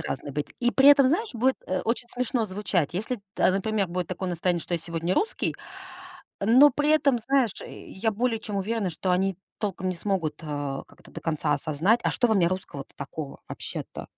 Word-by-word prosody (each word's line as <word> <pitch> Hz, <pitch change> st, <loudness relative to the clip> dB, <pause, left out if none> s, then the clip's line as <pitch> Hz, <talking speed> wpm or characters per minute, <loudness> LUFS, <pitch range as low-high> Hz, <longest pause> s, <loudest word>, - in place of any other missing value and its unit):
разный 140 Hz, +1 st, -4 dB
быть. 150 Hz, +1 st, -3 dB
И 245 Hz, 0 st, +2 dB
при 270 Hz, +1 st, +6 dB
этом, 285 Hz, -2 st, +8 dB
знаешь, 370 Hz, -, +1 dB
будет, 255 Hz, +3 st, +2 dB
а, 185 Hz, 0 st, -1 dB
очень 240 Hz, +1 st, -1 dB
смешно 245 Hz, -1 st, -1 dB
звучать. 190 Hz, -6 st, -1 dB
Если, 215 Hz, +8 st, -2 dB, 0.2 s
т -, -, -3 dB
а, -, -, +4 dB
например, 200 Hz, +1 st, 0 dB
будет 180 Hz, 0 st, -3 dB
такое 185 Hz, 0 st, -3 dB
настроение, 175 Hz, 0 st, 0 dB
что 175 Hz, -, -3 dB
я -, -, 0 dB
сегодня 170 Hz, +2 st, -2 dB
русский. 440 Hz, -, 0 dB, 0.9 s
Но 250 Hz, +8 st, +7 dB
при 295 Hz, +1 st, +1 dB
этом, 280 Hz, -5 st, +4 dB
знаешь, 255 Hz, -1 st, +2 dB
я 220 Hz, +3 st, -4 dB
более 230 Hz, +2 st, 0 dB
чем 210 Hz, -2 st, -5 dB
уверена, 200 Hz, -1 st, -1 dB
что 185 Hz, +3 st, -2 dB
они 190 Hz, +1 st, +1 dB, 0.2 s
толком 190 Hz, -3 st, -2 dB
не 185 Hz, -, -2 dB
смогут, 170 Hz, -5 st, -2 dB
э, 145 Hz, -3 st, -3 dB
как -, -, -21 dB
это -, -, -17 dB
до -, -, -8 dB
конца 155 Hz, -2 st, 0 dB
осознать: 155 Hz, +10 st, +2 dB
"А -, -, +3 dB
что 245 Hz, -, +2 dB
во 220 Hz, -, +3 dB
мне 185 Hz, -4 st, +4 dB
русского-то 170 Hz, -6 st, -5 dB
такого 140 Hz, +1 st, -7 dB
вообще-то?" -, -, -6 dB
195 Hz, 205 wpm, -26 LUFS, 170-235 Hz, 0.9 s, этом